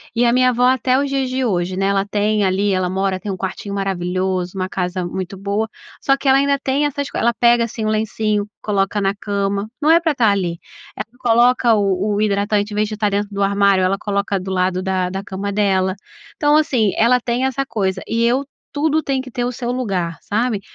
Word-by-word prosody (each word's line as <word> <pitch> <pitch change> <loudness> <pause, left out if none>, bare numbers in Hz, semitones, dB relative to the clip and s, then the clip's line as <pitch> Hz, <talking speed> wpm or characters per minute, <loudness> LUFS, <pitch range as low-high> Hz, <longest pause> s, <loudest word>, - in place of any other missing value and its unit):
E 240 +1 +3
a 235 - +4
minha 255 0 +4
avó, 245 0 0
até 255 0 +2
os 280 - -1
dias 270 -1 -1
de 260 +1 -1
hoje, 185 -5 -1
né, 195 +1 0
ela 195 0 +1
tem 210 0 +1
ali 195 +2 +1
ela 185 -1 0
mora 190 0 -1
tem 200 +2 -5
um 185 - -4
quartinho 195 +2 -5
maravilhoso, 185 -1 -2
uma 185 0 -2
casa 180 -1 -2
muito 185 +2 -5
boa, 200 +3 -1 0.3
só 275 - +3
que 275 0 -5
ela 265 - +6
ainda 280 0 +2
tem 275 +2 +1
essas 285 0 -2
co - - -6
ela 235 +1 +2
pega, 235 0 +3
assim, 225 -1 -6
o - - +1
lencinho, 215 -1 0
coloca 200 0 0
na 195 0 +1
cama. 200 0 -2
Não 300 - +2
é 335 - +6
pra 330 -2 +1
estar 235 -6 +3
ali. 180 -4 -1 0.4
Ela 215 - -4
coloca 240 0 +4
o 200 -3 +1 0.2
o - - 0
hidratante, 205 0 0
em - - -4
vez 210 0 +1
de 215 - -6
estar 210 0 0
dentro 205 0 -1
do 200 0 0
armário, 200 -1 +3
ela 190 +1 +1
coloca 200 -1 -1
do 190 +1 -7
lado 185 0 0
da 185 -1 -1
da 195 +2 -5
cama 200 +1 -4
dela. 190 -2 +1 0.4
Então, 295 0 +3
assim, 250 -9 +2
ela 245 +3 +4
tem 240 +1 -1
essa 265 +1 -1
coisa 190 -6 -2
e 230 +1 0
eu, 255 +4 +2 0.3
tudo 310 +1 +1
tem 275 -3 -1
que 260 -1 -11
ter 245 - -2
o 245 - -1
seu 245 -1 -4
lugar, 190 -10 -2
sabe? 215 -1 -1
205 Hz, 230 wpm, -19 LUFS, 195-245 Hz, 0.4 s, ela